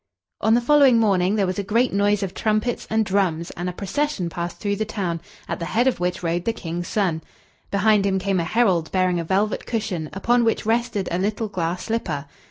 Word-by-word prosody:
On 220 +1 +4
the 240 - +3
following 275 -1 +5
morning 195 -3 +2
there 200 -2 +2
was 185 +2 -2
a - - -1
great 230 +6 +1
noise 205 0 +2
of 190 - -4
trumpets 215 +2 -1
and 220 0 +2
drums, 185 -5 0
and 175 +1 -4
a - - -3
procession 195 - -2
passed 170 +1 -4
through 200 -1 -2
the 220 - 0
town, 185 -6 -3 0.3
at - - -3
the 170 - -3
head 230 +8 +1
of 260 - +1
which 180 0 -2
rode 170 +1 -1
the 230 - +1
King's 170 -4 -5
son. 180 -7 0 0.5
Behind 205 +1 +3
him 195 -1 +1
came 190 0 0
a - - 0
herald, 180 -4 +1
bearing 185 -2 +1
a - - -2
velvet 195 +5 0
cushion, 190 -9 -2
upon 235 +5 +2
which 225 -2 0
rested 225 -3 0
a 175 - 0
little 210 +3 -1
glass 175 -2 -2
slipper. 170 -11 -2
200 Hz, 215 wpm, -23 LUFS, 175-220 Hz, 0.5 s, following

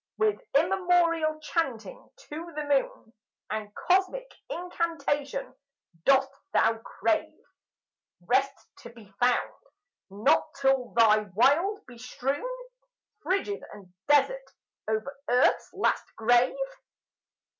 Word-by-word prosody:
With 430 -1 +1 0.2
immemorial 335 -2 +2
chanting 285 -8 -3 0.2
to 330 +3 -7
the 300 - -2
moon, 275 -5 -1 0.4
And 215 -1 -4
cosmic 385 +7 0 0.2
incantation, 335 - -2 0.5
dost 270 0 +4 0.2
thou 225 0 +3
crave 320 +7 -2 0.8
Rest 270 +8 0
to 235 - -11
be 225 -5 -16
found 245 0 +2 0.6
not 220 +12 +2
till 270 -2 +2
thy 220 -2 +6 0.2
wild 330 - +3
be 245 -2 -14
strewn 270 - -3 0.7
Frigid 395 +2 -1
and 190 -3 -14
desert 395 - +3 0.4
over 220 +6 -2
earth's 250 +1 +3
last - - -1
grave? 245 - +3
280 Hz, 100 wpm, -27 LUFS, 240-345 Hz, 0.8 s, thy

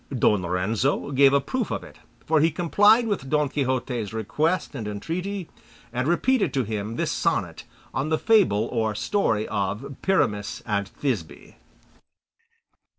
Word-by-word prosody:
Don 105 -4 +3
Lorenzo 100 +11 -1
gave 135 0 +5
a 140 - +4
proof 240 - -3
of - - -3
it, - - -14 0.3
for 155 0 +3
he 160 +2 +4
complied 205 +8 +4
with 200 -11 -2
Don 150 -1 +2
Quixote's 125 -6 -2
request 150 - -1
and 115 -7 -5
entreaty, 175 - -4 0.5
and 125 +2 -1
repeated 220 - +2
to 135 - +2
him 110 0 -4
this - - -1
sonnet - - -1 0.3
on 135 +4 -1
the 160 - +2
fable 180 - +3
or 110 -3 0
story 110 - 0
of 105 +7 -3
Pyramus 110 - 0
and 100 -3 -1
Thisbe. 95 - -4
135 Hz, 145 wpm, -25 LUFS, 105-165 Hz, 0.5 s, gave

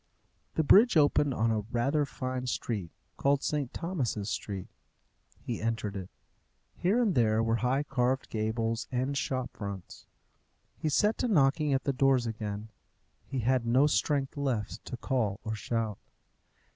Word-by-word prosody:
The 160 - +2
bridge 210 - +6
opened 145 -2 +3
on 115 +1 +2
a 110 - +1
rather 140 +5 +1
fine 130 -1 -4
street 105 -7 -2 0.3
called 140 0 +2
St. 145 -4 -1
Thomas's 125 - -2
Street. 100 -4 -4 0.7
He 120 - -4
entered 110 -2 -2
it. 95 -1 -6 0.7
Here 200 +7 +2
and 225 -6 +2
there 110 -3 +3
were 115 0 +1
high 125 +5 +1
carved 130 -2 0
gables 115 +1 -1
and 130 +2 -1
shop 130 -2 -2
fronts. 100 -3 -7 0.7
He 155 - -2
set 210 +9 +2
to 250 - +1
knocking 150 - +3
at 135 -1 +1
the 140 - 0
doors 135 -2 +3
again: 110 -1 -4 0.6
he 130 - -2
had 125 +1 +2
no 130 +5 +5
strength 145 -2 +1
left 130 -7 -2
to 125 - -5
call 115 -6 -1
or 110 - -3
shout. 110 -1 -2
125 Hz, 150 wpm, -30 LUFS, 110-140 Hz, 0.7 s, bridge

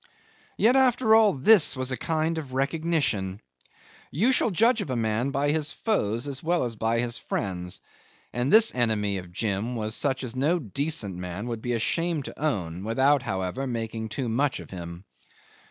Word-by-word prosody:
'Yet 240 +4 +4
after 250 -4 +4
all 220 -3 +6
this 160 +2 +5
was 130 0 -2
a - - 0
kind 160 +3 -1
of 135 -5 -9
recognition. 135 - -1 0.7
You 220 - +2
shall 255 - +2
judge 225 +4 +3
of 190 - -5
a 130 - -1
man 115 +2 0
by 140 +1 0
his 155 -1 -1
foes 120 - -1
as 140 -1 -5
well 170 -1 +1
as 120 -2 -3
by 115 +2 0
his 120 0 -2
friends, 90 -1 -4 0.5
and 120 +3 -1
this 225 +1 +6
enemy 105 -5 0
of 90 -1 -11
Jim 105 +5 -2
was 110 -1 -3
such 135 +1 0
as 125 -1 -5
no 150 +7 +2
decent 140 - -2
man 90 +3 -5
would 115 -2 -4
be 120 +1 -2
ashamed 155 +6 -1
to - - -8
own, 95 - -2
without, 135 +6 +3
however, 95 +5 -3
making 115 -2 -4
too 130 +3 -3
much 130 +5 0
of - - -11
him. 85 0 -8
130 Hz, 180 wpm, -26 LUFS, 110-160 Hz, 0.7 s, all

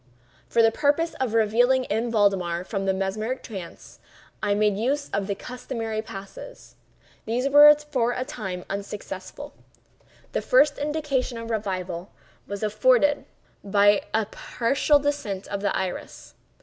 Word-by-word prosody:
For 230 - +3
the 225 - +5
purpose 300 +6 +1
of 245 -4 -1
relieving 245 +4 +3
M. 225 +3 -1
Valdemar 190 -5 +1
from 195 0 -3
the - - +4
mesmeric 215 +6 -2
trance, 190 -7 -9 0.4
I 205 -1 +1
made 210 -1 +2
use 275 +7 -1
of 200 -1 -1
the 200 - -1
customary 225 -1 -5
passes. 200 - -10 0.5
These, 245 +4 0
for 295 -4 +6
a 255 +1 -3
time, 210 -10 -5
were - - -16
unsuccessful. 200 +6 -7 0.8
The - - -1
first 305 -13 +3
indication 290 -4 -1
of 230 0 -6
revival 185 -4 -3 0.4
was 200 +1 -5
afforded 250 +7 +3 0.4
by 205 0 +4
a 220 0 +1
partial 260 +7 +1
descent 285 -10 -3
of 200 -1 -3
the 200 - 0
iris. 190 -1 -5
220 Hz, 135 wpm, -25 LUFS, 200-265 Hz, 0.8 s, for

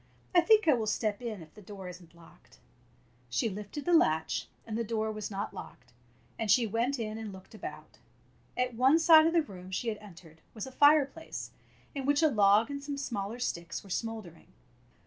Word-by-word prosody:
I 350 - +7
think 435 +1 +4
I 305 - +7
will 225 -3 -1
step 215 0 -1
in, 220 -7 -5
if 155 - -18
the 210 - -14
door 195 -1 -9
is 180 0 -9
n't 170 -1 -19
locked." 170 -1 -19 0.7
She 120 - 0
lifted 210 +8 -7
the 350 - +2
latch, 160 - +2 0.2
and 220 - -5
the 230 - 0
door 220 -1 -1
was 215 -1 -5
not 200 0 -4
locked, 120 -1 -11 0.5
and 225 -2 -2
she 235 +4 +5
went 230 +6 0
in 220 -1 -4
and 220 -2 -6
looked 190 +2 -13
about. 215 - -9 0.6
At 250 0 0
one 260 +6 +5
side 320 -1 +7
of 330 - +1
the 335 -2 +4
room 185 -8 -11
she 210 +5 -2
had 215 - -4
entered 170 -6 -15
was 215 - -5
a 265 - -9
fireplace 290 +3 +2 0.4
in 275 -1 -4
which 290 +2 +3
a 315 - +6
log 210 +1 +4
and 280 0 -5
some 285 -1 -4
smaller 225 -5 -4
sticks 170 -8 -4
were 195 - -12
smouldering. 220 -6 -5
220 Hz, 205 wpm, -30 LUFS, 195-275 Hz, 0.7 s, I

